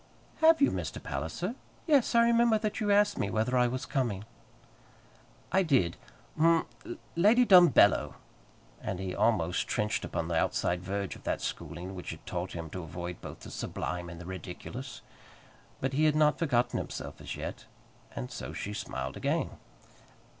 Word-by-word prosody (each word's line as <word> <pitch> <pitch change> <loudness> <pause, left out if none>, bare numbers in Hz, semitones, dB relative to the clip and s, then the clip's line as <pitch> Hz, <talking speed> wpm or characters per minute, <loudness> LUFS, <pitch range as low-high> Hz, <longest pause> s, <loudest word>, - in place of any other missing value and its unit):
"Have 320 -2 +5
you, - - +5
Mr. - - -4
Palliser? 180 +6 -3 0.3
Yes; 280 -7 +3
I 235 0 +6
remember 235 -1 +4
that 210 -1 -2
you 210 - 0
asked 205 0 +4
me 100 - 0
whether 110 +5 0
I 125 -1 +4
was 130 +2 -3
coming." 115 -7 -1 1.3
"I 190 +3 +4
did. 130 - +2 0.4
Hm 165 0 +4 0.5
Lady 215 +8 +5
Dumbello!" 180 -5 +6 0.7
and 95 - -3
he 95 -1 -3
almost 90 -6 +1
trenched 105 0 -1
upon 80 - -3
the 85 - -1
outside 85 +2 +1
verge 100 +1 -3
of - - -13
that - - 0
schooling 90 +3 -5
which 90 -2 -7
had - - -8
taught 90 +2 -4
him 85 -2 -6
to 95 - -5
avoid 85 +1 -6
both - - -9
the - - -9
sublime 90 -1 -4
and 85 -1 -9
the 90 - -9
ridiculous. 95 -2 -7 0.8
But 135 +1 -1
he 155 +3 +3
had 155 -1 +4
not 150 -1 +3
forgotten 125 -7 +1
himself - - -6
as - - -5
yet, - - -6 0.5
and 60 - -5
so - - -6
she 105 - -4
smiled 65 -9 -4
again. - - -1
120 Hz, 165 wpm, -30 LUFS, -, 1.3 s, I